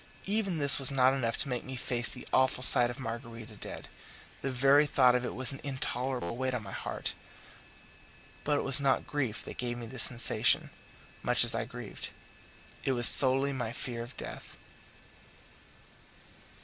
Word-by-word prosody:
Even 195 -3 -2
this 140 -3 +4
was 135 0 +6
not 130 -1 +2
enough 120 -4 -3
to - - -1
make 125 -3 -4
me 130 - -9
face 120 -1 -1
the 125 - -7
awful 130 -1 +1
sight 120 -1 +5
of 120 - -8
Margarita 115 -2 -8
dead; - - -9 0.5
the 135 - -4
very 135 +3 +3
thought 125 -3 +3
of 125 0 -1
it - - -6
was 130 -1 +1
an 135 - -10
intolerable 130 -6 -4
weight 130 +1 -3
on 115 - -5
my 95 - -10
heart; - - -6 1.3
but 145 -1 0
it - - -3
was 135 0 +6
not 135 -2 0
grief 130 -6 -4
that - - -10
gave 120 -1 -4
me 120 - -8
this 125 +1 -1
sensation, 120 -1 +4 0.5
much - - +1
as - - +3
I - - -3
grieved; - - -9 0.7
it 135 - -1
was 120 -1 +4
solely 135 +1 +6
my 125 -4 -5
fear 120 0 -6
of 120 +3 -11
death. - - -9
130 Hz, 175 wpm, -29 LUFS, 120-135 Hz, 1.3 s, was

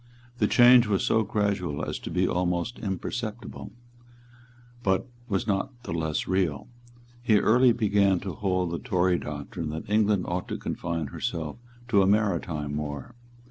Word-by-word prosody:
The - - +3
change 120 -1 +7
was 100 -3 +1
so 110 - +3
gradual 100 -8 -1
as - - -4
to - - -7
be 90 +2 +1
almost 90 +6 -1
imperceptible; 110 +3 -5 1.1
but 95 +1 +1 0.2
was 95 -3 0
not 110 +4 -2
the 85 - -5
less 80 -2 -1
real. 90 -6 0 0.5
He 115 -3 +4
early 120 +4 +5
began 100 -4 +2
to 95 -2 -5
hold 90 -1 -1
the 85 - -3
Tory 90 -6 +1
doctrine 75 +2 -5
that 80 +1 -6
England 105 -2 +2
ought 90 +1 -2
to - - -3
confine 85 -4 -3
herself 80 +2 -4 0.3
to 100 -4 +5
a 95 - +3
maritime 85 -8 0
war. 75 - -5
95 Hz, 150 wpm, -27 LUFS, 85-105 Hz, 1.1 s, change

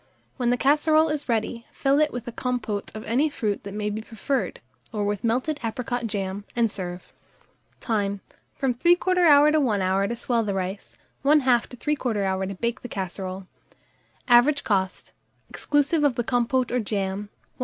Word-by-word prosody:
When 245 -3 +1
the 245 - +2
casserole 310 +4 +3
is 300 -3 -3
ready, 230 +1 -1
fill 275 +1 +2
it 305 -1 +2
with 245 -1 -6
a - - -3
compôte 230 -5 -3
of 215 - -6
any 260 +8 +1
fruit 215 -8 -2
that 200 - -8
may 210 0 -2
be 215 +1 -4
preferred, 230 +5 -3 0.3
or 210 -3 -2
with 205 +2 -2
melted 255 +6 0
apricot 235 +1 -2
jam, 200 -1 -3
and 230 -3 +2
serve. 180 -2 -7 0.7
Time. 200 -3 -1 0.3
From 265 -2 0
3/4 340 0 +5
to 310 - +4
1 220 -8 +1
hour 190 +2 +1
to 235 - -3
swell 235 0 0
the 200 -2 -2
rice, 190 +1 -4 0.3
1/2 265 -5 +4
to 250 - -12
3/4 245 -7 -1
hour 190 0 -1
to 195 - -5
bake 235 +5 -2
the 245 - -8
casserole. 190 -1 -5 0.8
Average 255 +4 +5
cost, 190 -3 -1 0.4
exclusive 295 +2 +1
of 280 -4 +3
the 240 - -1
compôte 245 +1 +1
or 250 - +1
jam, 200 -2 -3 0.3
1s. - - -37
235 Hz, 175 wpm, -25 LUFS, 205-270 Hz, 0.8 s, 3/4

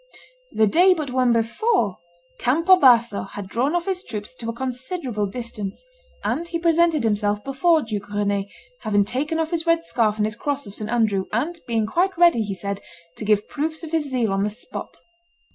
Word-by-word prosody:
The 220 - +3
day 360 - +5
but 300 -5 -4
one 255 -1 +2
before, 230 - +1 0.4
Campo 330 +9 +5
Basso 240 - +5
had 205 -2 -7
drawn 250 - 0
off 345 - 0
his 380 -2 -2
troops 210 0 -6
to 230 - -5
a - - 0
considerable 255 - -3
distance; 215 - -5 0.4
and 340 +2 -1
he 335 - -2
presented 335 -3 +3
himself 210 -1 0
before 310 +4 +2
Duke 210 -3 -5
Rene, 205 -1 -1 0.3
having 205 -2 +1
taken 280 +9 -2
off 320 0 -1
his 335 -1 -2
red 330 0 +3
scarf 220 -3 +1
and 210 - +1
his 215 0 -3
cross 285 +3 -3
of 200 - -10
St. 215 +1 -5
Andrew, 215 -5 +1
and 305 +10 -1
being 225 -2 +1
quite 355 - 0
ready, 345 -9 +5
he 205 -2 -3
said, 200 +2 -4 0.4
to 215 - -6
give 210 -1 +2
proofs 315 +2 -3
of 320 - -7
his 315 -3 0
zeal 240 -6 0
on 195 0 +1
the 210 - 0
spot. 215 +4 -8
240 Hz, 195 wpm, -23 LUFS, 210-325 Hz, 0.4 s, day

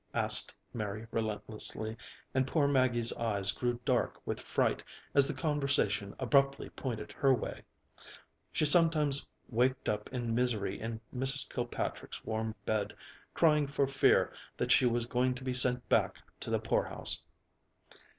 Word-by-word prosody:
asked - - +5 0.2
Mary 105 0 -5
relentlessly, 110 0 0 0.4
and 130 0 0
poor 145 0 +1
Maggie's 130 -4 +4
eyes 105 -4 +1
grew 120 +3 -3
dark 130 -3 -1
with - - -4
fright - - -1 0.3
as 140 -1 +5
the 150 - -1
conversation 140 -9 +1
abruptly 135 +2 0
pointed 110 -5 -6
her 135 - +1
way. 125 - -3 0.9
She - - 0
sometimes 150 -3 +4 0.2
waked 125 +2 -1
up 105 0 -3
in 120 -3 -3
misery 115 -5 -1
in 115 0 -6 0.2
Mrs. 135 +2 +3
Kilpatrick's - - -5
warm 110 0 -4
bed, 105 -1 -2 0.4
crying 150 -3 +2
for 140 0 0
fear 135 0 +2 0.2
that - - -1
she 125 - +5
was 120 0 0
going 125 +1 -1
to 130 - -9
be 130 -1 -3
sent 125 -1 +4
back - - 0 0.2
to - - -4
the - - +1
poorhouse. - - 0
125 Hz, 140 wpm, -31 LUFS, 110-135 Hz, 0.9 s, asked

